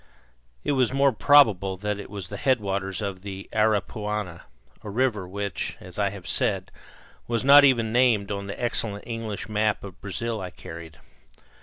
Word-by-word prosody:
It - - 0
was 130 -4 +2
more 140 +1 +3
probable 110 -8 +4
that 105 +1 -3
it - - -8
was 100 -3 -7
the 100 - -6
headwaters 100 -6 -1
of 95 -2 -4
the 95 0 -7
Aripuanan, 105 -3 -1 0.4
a 105 - -8
river 105 -4 0
which, 100 -1 -4
as 90 +2 -9
I 100 -1 +2
have 95 -3 -10
said, - - 0 0.6
was 115 +1 -1
not 145 +1 +9
even 115 -5 +3
named 120 -5 +3
on 100 -1 -4
the 100 - -6
excellent 115 -4 -1
English 115 -4 -5
map 105 0 0
of 95 -1 -10
Brazil 110 +3 -3
I 90 - -5
carried. 80 -1 -10
105 Hz, 165 wpm, -25 LUFS, 95-115 Hz, 0.6 s, not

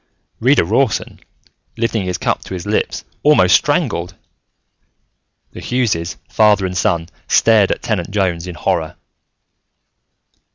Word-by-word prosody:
Reader - - +3
Rawson, - - 0 0.6
lifting 115 -3 -1
his 90 -1 -2
cup - - -2
to 95 - -6
his 90 - -7
lips, 105 +1 -1 0.2
almost 100 -12 +4
strangled. 115 - 0 1.4
The - - -10
Hugheses, 100 -10 -1
father 105 -3 +3
and 90 0 -4
son 85 -4 0 0.2
stared 110 -4 +4
at - - -3
Tenant 95 -6 -2
Jones 90 -4 -1
in 90 - -7
horror. 80 -2 -2
95 Hz, 120 wpm, -17 LUFS, 90-110 Hz, 1.4 s, almost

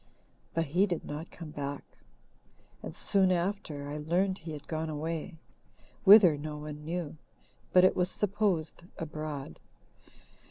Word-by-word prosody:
But 165 0 +2
he 180 +8 +2
did 175 -4 -3
not 150 +3 -6
come 160 -3 -9
back, 145 -1 -6 0.8
and - - -7
soon 190 -2 +3
after 170 -5 -2
I 145 +1 -4
learned 185 +5 +1
he 165 -1 -7
had 145 -1 -9
gone 160 0 -2
away 160 +3 -4 0.7
whither 190 -7 +9
no 150 0 -5
one 150 0 -7
knew, 165 -1 -4 0.5
but 180 - +6
it 185 - +5
was 180 0 +1
supposed 190 -6 -1
abroad. 155 - -5
160 Hz, 135 wpm, -30 LUFS, 150-180 Hz, 0.8 s, whither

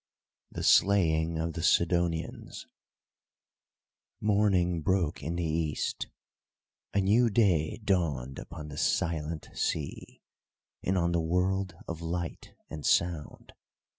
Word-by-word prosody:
THE - - -5
SLAYING 85 -5 +4
OF 80 +1 -2
THE 85 - -4
SIDONIANS 85 -1 0 1.5
Morning 95 -5 +2
broke 90 -2 0
in 80 +4 -3
the 85 - -1
East. 80 -1 -2 0.8
A 100 - +2
new 110 +5 +4
day 95 -8 +2
dawned 75 -10 0
upon 80 -2 -8
the 75 - -8
silent 80 -1 -1
sea, 75 -3 -3 0.6
and 95 +1 0
on 85 -1 +1
the 85 -1 +1
world 90 +2 0
of 85 0 -5
light 85 0 -5
and 75 -2 -7
sound. 85 -2 0
85 Hz, 110 wpm, -29 LUFS, 80-95 Hz, 1.5 s, SLAYING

